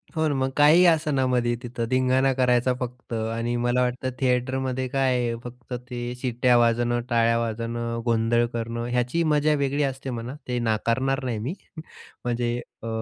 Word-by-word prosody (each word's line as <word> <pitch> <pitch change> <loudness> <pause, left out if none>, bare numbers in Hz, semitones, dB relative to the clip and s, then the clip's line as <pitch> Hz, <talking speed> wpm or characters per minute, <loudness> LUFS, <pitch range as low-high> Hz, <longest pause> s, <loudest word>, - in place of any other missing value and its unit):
हो 160 0 +1
ना. 145 - 0
मग 130 0 0
काही 155 +5 +6
असं 155 -4 +3
ना 130 -1 +2
मध्ये 120 -1 +1
तिथं 120 -1 -4
धिंगाणा 130 +1 +2
करायचा 125 -1 +2
फक्त 125 -1 -6
आणि 115 +2 -2
मला 120 +1 +1
वाटतं 125 +1 -1
थिएटरमध्ये 130 0 0
काय 135 -1 +1
आहे? 120 -1 -1
फक्त 125 +1 -9 0.2
ते 120 0 -4
शिट्ट्या 125 -1 +2
वाजवणं, 120 +1 +2
टाळ्या 115 0 +3
वाजवणं, 115 +1 -3
गोंधळ 115 0 +2
करणं, 115 0 -3
ह्याची 125 +7 0
मजा 150 +1 +3
वेगळी 140 +2 0
असते 135 0 -3
म्हणा. 120 +3 -5
ते 125 -1 -1
नाकारणार 130 +5 0
नाही 115 -4 -2
मी. 130 +11 -3 0.7
म्हणजे 120 0 0 0.3
अ, - - -5
125 Hz, 165 wpm, -25 LUFS, 120-130 Hz, 0.7 s, काही